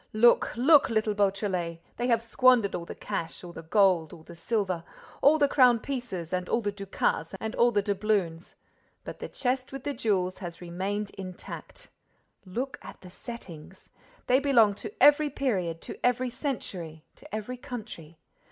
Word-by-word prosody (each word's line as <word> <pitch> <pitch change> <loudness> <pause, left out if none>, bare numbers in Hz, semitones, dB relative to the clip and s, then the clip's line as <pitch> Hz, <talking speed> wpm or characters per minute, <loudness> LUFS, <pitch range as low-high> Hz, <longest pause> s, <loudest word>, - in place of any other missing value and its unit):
"Look, 235 +2 +4
look, 285 +4 +6
little 220 -2 +1
Beautrelet! 195 -4 0 0.2
They 240 - -1
have 230 -2 +2
squandered 230 -3 +4
all 170 - -4
the - - -8
cash, 165 +2 -4
all 175 -1 -9
the 165 - -8
gold, 175 -2 +3
all 160 - -12
the 170 - -12
silver, 185 -2 -1 0.4
all 300 +3 +6
the 290 -2 +4
crown 250 -4 +5
pieces 220 - -5
and 180 0 -2
all 235 - +1
the 205 -2 -1
ducats 195 -4 -2
and 220 +2 -4
all 240 0 +4
the 205 -3 +1
doubloons; 195 -5 -1 0.5
but - - -8
the - - -6
chest 255 0 -2
with 270 -2 -7
the 285 - -2
jewels 195 -7 0
has 175 -3 -7
remained 195 +4 -3
intact. 185 -2 -9 0.5
Look 255 +9 -4
at - - -11
the 180 - -12
settings. 190 -6 -10 0.4
They 255 +1 +4
belong 240 -7 +4
to - - -6
every 295 +1 +6
period, 190 - -1
to - - -8
every 250 0 +1
century, 175 - -5
to - - -8
every 220 +4 -5
country. 215 - -8
210 Hz, 170 wpm, -28 LUFS, 180-245 Hz, 0.5 s, look